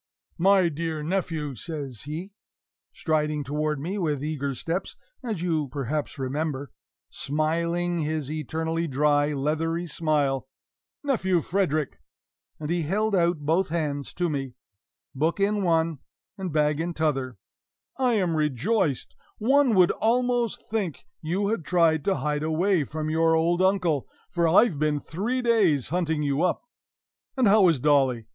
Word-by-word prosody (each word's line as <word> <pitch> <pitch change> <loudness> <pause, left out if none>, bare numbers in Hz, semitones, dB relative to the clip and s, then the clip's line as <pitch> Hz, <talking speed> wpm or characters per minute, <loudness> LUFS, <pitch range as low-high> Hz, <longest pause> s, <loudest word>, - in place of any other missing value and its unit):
"My 190 0 +5
dear 160 -1 -3
nephew!" 160 -4 -2
says 140 -3 -6
he, 165 +7 -6 0.6
striding 150 -2 -1
toward 150 +2 -1
me 185 +8 -3
with 150 -6 -1
eager 140 -3 -2
steps, 165 +8 -3 0.3
as 215 -8 -3
you 160 -4 0
perhaps 140 +3 -3
remember, 140 0 -3 0.4
smiling 170 +4 -1
his 155 -2 -2
eternally 160 +2 -2
dry, 145 +1 +2
leathery 160 +4 -1
smile 145 -5 0 0.6
"Nephew 190 -11 +1
Frederick!" 160 -4 -1 0.6
and 155 +1 -4
he 175 0 +1
held 205 +6 0
out 170 -3 +2
both 170 +5 +2
hands 150 -4 -2
to 175 - 0
me, 135 -5 -3 0.6
book 160 +7 0
in 205 +1 +2
one 165 -4 +1 0.4
and 190 -3 -4
bag 150 0 +1
in 170 +1 -2
t'other 135 -7 -1 0.6
"I 255 -2 +3
am 185 -6 +1
rejoiced! 155 - 0 0.2
One 260 +1 +3
would 180 -2 +5
almost 240 0 0
think 200 -8 -3 0.2
you 190 +6 -1
had 220 -6 -1
tried 165 -2 +2
to 195 - +2
hide 150 -3 -1
away 160 +1 +1
from 155 +2 -4
your 165 0 +3
old 170 +2 +2
uncle, 185 -7 +2 0.2
for 170 -1 +2
I've 170 -1 +4
been 150 -1 +1
three 220 - -2
days 195 - +3
hunting 160 -2 0
you 140 +1 0
up. 180 - +1 0.7
And 255 -4 +4
how 200 -1 +6
is 165 -6 +3
Dolly? 130 -5 +2
160 Hz, 140 wpm, -26 LUFS, 150-185 Hz, 0.7 s, how